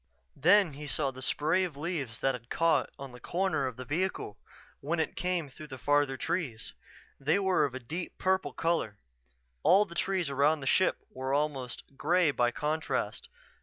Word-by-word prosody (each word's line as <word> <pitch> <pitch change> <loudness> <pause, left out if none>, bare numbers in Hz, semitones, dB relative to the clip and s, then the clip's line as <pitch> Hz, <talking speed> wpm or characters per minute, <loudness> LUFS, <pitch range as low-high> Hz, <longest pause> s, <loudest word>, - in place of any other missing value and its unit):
Then 180 +3 +5
he 150 +2 -7
saw 140 -1 0
the 130 0 -10
spray 155 +8 +1
of 170 -6 -4
leaves 145 -7 -3
that 135 - +2
had 115 -1 -9
caught 165 0 +2
on 135 -1 -8
the 125 - -12
corner 165 -2 0
of 130 - -5
the 130 +1 -7
vehicle 165 - -2 0.4
when 160 +4 -1
it 160 - -1
came 180 -3 -1
through 150 +3 -11
the 130 -3 -8
farther 145 0 +2
trees. 130 -8 -3 0.5
They 150 +6 +2
were 190 -5 +3
of 135 -3 -4
a - - -4
deep 160 +9 -6
purple 190 0 +1
color. 165 -11 -1 0.6
All 200 - +6
the 170 - -11
trees 185 0 0
around 140 +2 +2
the - - -5
ship 185 +7 +3
were 130 +1 -2
almost 140 -5 -2
gray 170 +1 +3
by 120 -3 +2
contrast. 150 +5 -2
150 Hz, 180 wpm, -30 LUFS, 135-175 Hz, 0.6 s, All